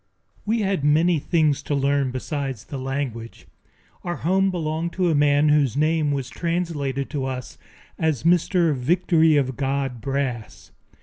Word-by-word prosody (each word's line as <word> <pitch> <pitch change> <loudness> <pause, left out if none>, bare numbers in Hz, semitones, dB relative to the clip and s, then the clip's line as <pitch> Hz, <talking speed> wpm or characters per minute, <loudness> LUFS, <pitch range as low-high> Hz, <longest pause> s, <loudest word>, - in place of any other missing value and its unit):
We 225 +1 +1
had 195 -7 -1
many 160 +3 +3
things 155 -2 +1
to 145 - -2
learn 140 -1 +1
besides 135 -2 -4
the 140 - -7
language. 130 -4 -5 0.6
Our 175 0 -3
home 190 +4 +1
belonged 165 -1 -3
to 180 -2 +1
a - - +2
man 145 0 +3
whose 145 -4 +2
name 155 0 +2
was 135 -3 -2
translated 150 -4 -2
to 140 -3 -2
us 130 -2 -6 0.4
as 155 -6 0
Mr. 170 -1 +3
Victory 160 +3 +3
of 130 -2 0
God 135 -2 -2
Brass. 135 -3 -4
145 Hz, 145 wpm, -23 LUFS, 135-165 Hz, 0.6 s, many